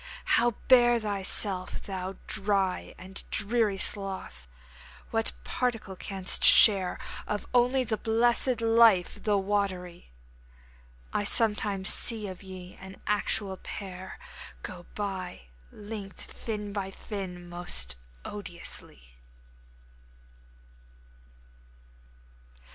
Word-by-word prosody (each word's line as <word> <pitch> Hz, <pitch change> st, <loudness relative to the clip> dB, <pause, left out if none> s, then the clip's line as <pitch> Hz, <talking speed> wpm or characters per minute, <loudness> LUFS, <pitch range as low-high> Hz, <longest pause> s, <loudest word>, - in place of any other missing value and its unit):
How 240 Hz, -1 st, +4 dB
bear 240 Hz, -2 st, +6 dB
thyself, 195 Hz, -2 st, 0 dB
thou 190 Hz, -1 st, -5 dB
dry 195 Hz, -2 st, -1 dB
And 190 Hz, +1 st, -5 dB
dreary 215 Hz, -1 st, +1 dB
sloth? 190 Hz, -, -2 dB, 0.6 s
What -, -, 0 dB
particle 225 Hz, -, -2 dB
canst 190 Hz, 0 st, +1 dB
share 195 Hz, -4 st, +7 dB, 0.3 s
Of 210 Hz, -1 st, -2 dB
the -, -, -17 dB
only 250 Hz, +1 st, +3 dB
blessed 235 Hz, +2 st, +2 dB
life, 225 Hz, -5 st, +4 dB
the 210 Hz, -2 st, +2 dB
watery? 190 Hz, -, -2 dB, 1.0 s
I -, -, +1 dB
sometimes 205 Hz, -2 st, +2 dB
see 225 Hz, -3 st, -1 dB
of 185 Hz, -2 st, -8 dB
ye 185 Hz, -2 st, -10 dB
an 190 Hz, 0 st, -11 dB
actual 205 Hz, -1 st, 0 dB
pair 190 Hz, -1 st, -7 dB, 0.5 s
Go 175 Hz, -1 st, -8 dB
by! 190 Hz, -, -4 dB, 0.3 s
linked 205 Hz, -2 st, -6 dB
fin 210 Hz, -3 st, -5 dB
by 195 Hz, -2 st, -3 dB
fin! 190 Hz, -3 st, -7 dB
most 175 Hz, -, -1 dB, 0.3 s
odiously. 170 Hz, -, -7 dB
200 Hz, 90 wpm, -28 LUFS, 185-215 Hz, 1.0 s, share